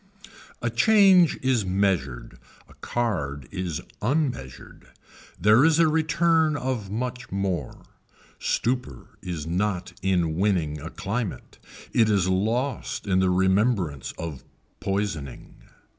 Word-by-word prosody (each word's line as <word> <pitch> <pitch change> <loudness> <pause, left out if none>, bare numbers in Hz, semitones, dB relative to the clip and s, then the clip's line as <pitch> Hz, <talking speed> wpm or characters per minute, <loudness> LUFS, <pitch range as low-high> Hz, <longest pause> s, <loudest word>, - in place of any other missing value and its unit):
A 120 - 0
change 190 - +5
is 130 -4 +2
measured, 80 -12 -1 0.3
a - - -18
card 75 - -3
is 90 -5 -3 0.2
unmeasured. 125 - -3 0.5
There 105 +7 +5
is 160 0 +4
a 165 -1 +5
return 160 0 +2
of 125 -7 -3
much 125 +3 -4
more. 95 -8 -3 0.6
Stupor 120 - -2
is 85 -4 -5
not 90 +2 -2
in 90 -4 +1
winning 85 -7 0
a 80 - -6
climate. 105 +3 -5 0.3
It 110 -2 +4
is 100 -4 +2
lost 115 +9 -1
in 95 -2 +2
the 95 0 +3
remembrance 95 - +1
of 80 -5 -6 0.4
poisoning. 95 -10 -4
100 Hz, 115 wpm, -25 LUFS, 85-125 Hz, 0.6 s, change